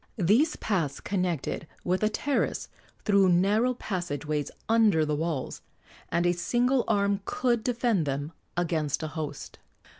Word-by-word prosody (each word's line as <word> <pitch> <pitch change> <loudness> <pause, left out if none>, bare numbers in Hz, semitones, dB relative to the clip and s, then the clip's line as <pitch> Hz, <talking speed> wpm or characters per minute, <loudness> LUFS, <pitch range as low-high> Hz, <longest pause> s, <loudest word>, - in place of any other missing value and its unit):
These 225 - +3
paths 165 -10 -1
connected 180 -5 -2 0.2
with 185 +1 0
the 215 - +3
terrace 280 +5 -1 0.4
through 200 -2 +5
narrow 205 +8 +3
passage 175 - -4
ways 150 -1 -1 0.2
under 215 -8 +4
the 150 - -1
walls, 155 -3 -3 0.5
and 170 0 +1
a 175 - +4
single 245 +9 +1
arm 200 -1 +2
could 240 -3 0
defend 235 - +1
them 140 +3 -2 0.3
against 160 -4 0
a 155 - -3
host. 150 -3 -6
185 Hz, 140 wpm, -28 LUFS, 155-220 Hz, 0.5 s, through